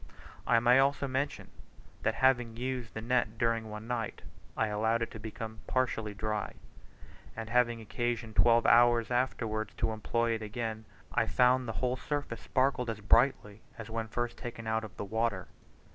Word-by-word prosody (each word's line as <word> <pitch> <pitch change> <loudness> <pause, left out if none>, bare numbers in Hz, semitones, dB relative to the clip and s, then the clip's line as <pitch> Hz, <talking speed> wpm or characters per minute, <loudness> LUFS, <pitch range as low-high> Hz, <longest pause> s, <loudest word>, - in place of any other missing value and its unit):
I 115 - +5
may 125 +2 +5
also 140 +1 +2
mention, 135 +2 -3 0.5
that - - 0
having 120 -3 +2
used 125 -1 -4
the 110 - -4
net 120 -2 0
during 115 -1 0
one 105 +1 -7
night, 120 -2 -3 0.3
I 110 - +2
allowed 110 +2 +1
it - - -6
to 110 - -8
become 110 0 -7
partially 110 -5 -1
dry, 110 0 -3 0.8
and 110 0 -6
having 120 -1 +3
occasion 115 0 -3
twelve 115 +1 +4
hours 120 0 +5
afterwards 115 -3 -1
to 115 -1 0
employ 115 +2 0
it 110 -1 -1
again, 110 0 -4 0.3
I - - +2
found 125 0 +3
the 115 - -3
whole 125 +1 0
surface 145 -4 -4
sparkled 130 -2 +1
as 110 -1 -3
brightly 105 -1 +2 0.2
as 115 -1 -8
when 115 0 -2
first 120 +1 -3
taken 115 -2 -7
out 110 0 0
of 110 - -10
the - - -4
water. 110 -2 -1
115 Hz, 170 wpm, -31 LUFS, 110-125 Hz, 0.8 s, I